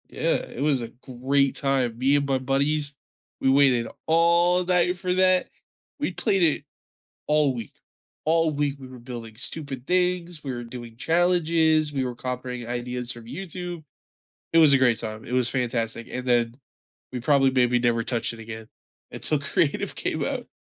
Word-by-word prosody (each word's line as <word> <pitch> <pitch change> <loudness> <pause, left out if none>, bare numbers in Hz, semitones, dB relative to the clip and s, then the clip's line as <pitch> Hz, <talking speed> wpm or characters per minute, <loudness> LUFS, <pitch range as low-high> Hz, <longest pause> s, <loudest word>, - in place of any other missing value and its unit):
Yeah, - - 0
it 125 - -7
was 140 -3 +2
a 115 - -5
great 130 +3 0
time. 130 -4 0
Me 135 +3 +3
and 140 -1 +1
my 135 -1 +2
buddies, 140 +3 0 0.5
we 135 - +2
waited 130 -4 +4 0.2
all 170 +2 +3
night 180 0 +2
for 180 0 -1
that. 185 0 +3 0.5
We - - -1
played 195 -5 +1
it 155 -3 +2 0.6
all 150 -2 +3
week. 115 -3 -7 0.5
All 165 0 +3
week, 145 -1 -1
we 130 - -10
were 130 -1 -11
building 120 -2 -8
stupid 135 +1 -4
things, 180 -2 0
we 135 - -3
were 120 0 -5
doing 120 -1 -9
challenges, 160 0 +2
we 135 -2 -1
were 125 -1 -4
copying 125 -1 -5
ideas 125 0 -3
from 120 -2 -10
YouTube. 175 +3 -6 0.7
It - - +5
was 155 -4 +8
a 135 - +5
great 125 -3 +4
time. 110 -1 -5
It 120 - -6
was 125 -2 +2
fantastic, 115 -2 -2
and 125 0 -4
then 120 -1 +2 0.6
we 125 - -4
probably 135 +1 +3
maybe 125 -1 +3
never 120 -1 +1
touched 120 -1 -1
it - - -12
again 110 0 -8 0.4
until - - +1
Creative - - 0
came - - -2
out. - - -3
135 Hz, 170 wpm, -25 LUFS, 120-160 Hz, 0.7 s, was